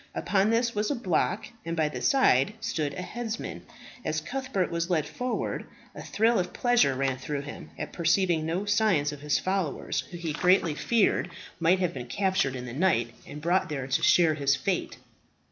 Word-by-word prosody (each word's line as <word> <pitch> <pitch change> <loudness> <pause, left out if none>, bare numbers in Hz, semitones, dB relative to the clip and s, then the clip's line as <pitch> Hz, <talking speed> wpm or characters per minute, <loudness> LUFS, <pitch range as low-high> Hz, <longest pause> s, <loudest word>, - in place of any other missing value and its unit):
Upon 200 +1 +2
this 235 +1 +1
was 210 0 0
a 285 - 0
block, 185 -10 0 0.2
and 165 0 -4
by 155 -1 +2
the 150 - -5
side 210 - +4
stood 150 -8 -2
a 180 - -4
headsman. 230 +3 -5 0.4
As 155 0 -1
Cuthbert 245 - -2
was 170 +1 -1
led 160 -4 +1
forward 250 +10 -3 0.3
a - - -8
thrill 225 +1 +2
of 180 0 -3
pleasure 245 - +3
ran 135 -1 -1
through 140 +2 -3
him 145 - -9
at - - -6
perceiving 170 -1 +2
no 170 +5 -2
signs 205 -8 +2
of 145 -1 -9
his 150 0 +1
followers, 185 -5 -1
who 175 - -7
he 165 -3 -3
greatly 180 -1 +3
feared 195 +4 +1 0.3
might 170 +2 +4
have 180 -2 -1
been 125 -2 -6
captured 185 -2 0
in 125 -1 -5
the 120 - -7
night, 125 -8 +1
and 150 +1 -9
brought 175 +2 +2
there 140 -4 -3
to 135 - 0
share 165 -3 +5
his 140 -2 +2
fate. 135 - -2
170 Hz, 190 wpm, -27 LUFS, 145-200 Hz, 0.4 s, share